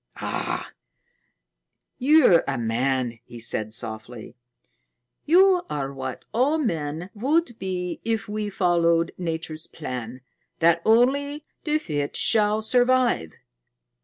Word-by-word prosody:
"Ah, -, -, -4 dB, 1.3 s
you're 270 Hz, -, +5 dB
a 140 Hz, -, -1 dB
man!" 120 Hz, +1 st, -1 dB
he 120 Hz, -, -12 dB
said 110 Hz, -2 st, -3 dB
softly. 110 Hz, 0 st, -5 dB, 0.9 s
"You 365 Hz, +3 st, +5 dB
are 140 Hz, -2 st, -3 dB
what 130 Hz, -1 st, -6 dB
all 270 Hz, +7 st, +2 dB
men 165 Hz, -, -3 dB
would 265 Hz, +3 st, 0 dB
be 180 Hz, -2 st, -4 dB
if 225 Hz, -3 st, -1 dB
we 210 Hz, 0 st, -3 dB
followed 170 Hz, -3 st, +2 dB
Nature's 160 Hz, -2 st, -4 dB
plan 125 Hz, -4 st, -7 dB, 0.4 s
that 170 Hz, 0 st, +3 dB
only 280 Hz, +6 st, +2 dB, 0.2 s
the 305 Hz, -1 st, +2 dB
fit 145 Hz, -, -3 dB
shall 215 Hz, -1 st, +3 dB
survive. 245 Hz, -, +2 dB
175 Hz, 105 wpm, -24 LUFS, -, 1.3 s, you're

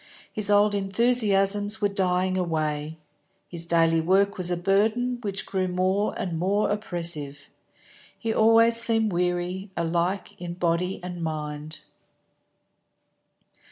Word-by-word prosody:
His 210 Hz, -1 st, +1 dB
old 205 Hz, 0 st, +4 dB
enthusiasms 205 Hz, 0 st, +2 dB
were 205 Hz, -, +2 dB
dying 185 Hz, -1 st, 0 dB
away. 155 Hz, -3 st, -2 dB, 0.5 s
His 170 Hz, -1 st, -5 dB
daily 165 Hz, -1 st, +3 dB
work 195 Hz, +4 st, +2 dB
was 180 Hz, -2 st, -1 dB
a 175 Hz, -, -1 dB
burden 220 Hz, +7 st, +1 dB
which 200 Hz, -3 st, -3 dB
grew 185 Hz, -1 st, -1 dB
more 185 Hz, +3 st, 0 dB
and 165 Hz, -3 st, -3 dB
more 200 Hz, +4 st, +1 dB
oppressive. 165 Hz, -8 st, -3 dB, 0.7 s
He 225 Hz, -1 st, -2 dB
always 225 Hz, +1 st, +5 dB
seemed 225 Hz, -3 st, +2 dB
weary, 180 Hz, +2 st, -2 dB
alike 170 Hz, +3 st, -2 dB
in 175 Hz, -1 st, -5 dB
body 175 Hz, +1 st, -1 dB
and 180 Hz, -1 st, -6 dB
mind. 155 Hz, -1 st, -5 dB
185 Hz, 120 wpm, -25 LUFS, 170-205 Hz, 0.7 s, always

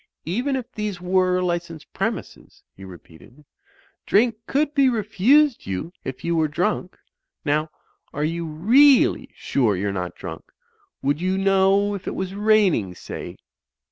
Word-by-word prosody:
"Even 245 Hz, -, -1 dB
if 255 Hz, -1 st, -5 dB
these 210 Hz, -4 st, -4 dB
were 185 Hz, 0 st, +1 dB
licensed 170 Hz, -3 st, -4 dB
premises," -, -, -5 dB
he 95 Hz, -, -13 dB
repeated, 95 Hz, -, -15 dB, 0.6 s
"drink 230 Hz, +3 st, +3 dB
could 290 Hz, +2 st, 0 dB
be 275 Hz, -2 st, +4 dB
refused 240 Hz, +5 st, +2 dB
you 95 Hz, -, -4 dB
if 135 Hz, -, -7 dB
you 170 Hz, 0 st, 0 dB
were 160 Hz, -1 st, +2 dB
drunk. 180 Hz, +4 st, -2 dB, 0.5 s
Now, 155 Hz, +1 st, 0 dB, 0.4 s
are 145 Hz, -, -3 dB
you 165 Hz, +2 st, -2 dB
really 245 Hz, -, +4 dB
sure 115 Hz, -7 st, 0 dB
you're 100 Hz, +1 st, -2 dB
not 90 Hz, -2 st, -4 dB
drunk. -, -, -8 dB, 0.6 s
Would 145 Hz, +3 st, 0 dB
you 185 Hz, +1 st, 0 dB
know 195 Hz, +1 st, +3 dB
if 200 Hz, -, -7 dB
it -, -, -3 dB
was 190 Hz, 0 st, -4 dB
raining, 200 Hz, -, +2 dB
say?" -, -, -8 dB
180 Hz, 140 wpm, -22 LUFS, 150-210 Hz, 0.6 s, be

